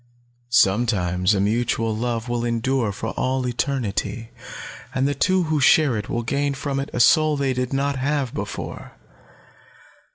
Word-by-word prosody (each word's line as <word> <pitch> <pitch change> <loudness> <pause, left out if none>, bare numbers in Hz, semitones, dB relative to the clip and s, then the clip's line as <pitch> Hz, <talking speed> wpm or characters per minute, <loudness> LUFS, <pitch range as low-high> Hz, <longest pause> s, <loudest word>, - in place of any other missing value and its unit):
Sometimes 95 -4 +2
a - - 0
mutual 110 +1 0
love 115 0 -2
will 120 -1 -2
endure 120 0 0
for 110 +3 -5
all 130 +1 -1
eternity, 115 -3 -2 0.6
and 130 +1 +2
the 145 - 0
two 185 +6 +2
who 155 -2 0
share 145 -1 +4
it 105 -1 -4
will 120 - -2
gain 140 +4 -1
from 140 0 -3
it 135 - -4
a - - -3
soul 155 +4 +4
they 135 -2 0
did 125 0 -2
not 140 0 0
have 135 -1 -1
before. - - -6
125 Hz, 155 wpm, -22 LUFS, 115-140 Hz, 0.6 s, share